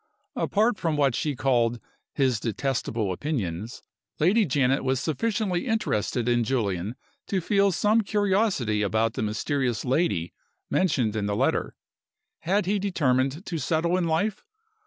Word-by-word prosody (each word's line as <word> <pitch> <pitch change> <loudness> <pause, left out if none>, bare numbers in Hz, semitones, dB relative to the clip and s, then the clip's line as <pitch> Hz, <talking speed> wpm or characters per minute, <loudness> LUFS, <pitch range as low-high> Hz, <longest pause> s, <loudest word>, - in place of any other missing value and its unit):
Apart 215 +2 +1
from 165 -4 0
what 140 -3 +3
she 145 +3 -1
called 120 -2 +1 0.3
"his 130 -5 +1
detestable 115 -3 -2
opinions," 110 - -4 0.4
Lady 200 +8 +4
Janet 135 -1 +2
was 130 -1 +1
sufficiently 195 - -1
interested 125 - 0
in 120 -1 +3
Julian 105 -4 -1 0.3
to 195 - 0
feel 200 +2 +2
some 210 +5 +3
curiosity 195 - +1
about 110 +2 +1
the - - -3
mysterious 120 +4 -1
"lady" 125 - 0 0.4
mentioned 130 - +1
in 105 -2 -1
the 100 - -1
letter. - - 0 0.6
Had 190 +4 0
he 200 +2 +1
determined 145 -5 0
to 165 -2 -3
settle 165 +5 +1
in 185 -2 +1
life? 190 +6 0
140 Hz, 135 wpm, -26 LUFS, 115-185 Hz, 0.6 s, Lady